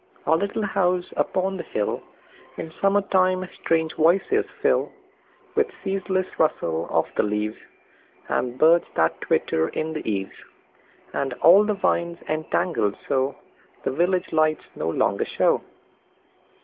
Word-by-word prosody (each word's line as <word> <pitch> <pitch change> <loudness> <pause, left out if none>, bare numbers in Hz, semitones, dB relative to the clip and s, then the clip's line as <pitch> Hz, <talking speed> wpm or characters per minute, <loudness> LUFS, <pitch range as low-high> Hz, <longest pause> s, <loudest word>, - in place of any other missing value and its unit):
Our 160 - +4
little 200 +4 -1
house 180 -3 +1
upon 190 +1 0
the - - -3
hillIn 160 +8 -6
summer 195 +1 +4
time 185 -1 +2
strange 160 -1 0
voices 185 - +3
fill; - - +2 0.6
With 445 0 +2 0.2
ceaseless 190 -1 -1
rustle 85 - 0
of - - +2
the - - +3
leaves, 105 +1 -2 0.7
And 125 0 -1
birds 165 +4 +5
that 80 0 +1
twitter 80 0 +1
in 160 0 -3
the 155 - -4
eaves, 95 -1 -3 0.8
And 135 -2 -1
all 180 +10 +6
the 210 0 0
vines 170 -3 0
entangled 155 - 0
soThe 135 0 -4
village 180 +2 +1
lights 155 -1 +2
no - - -2
longer - - +1
show. - - +3
165 Hz, 125 wpm, -24 LUFS, 135-185 Hz, 0.8 s, all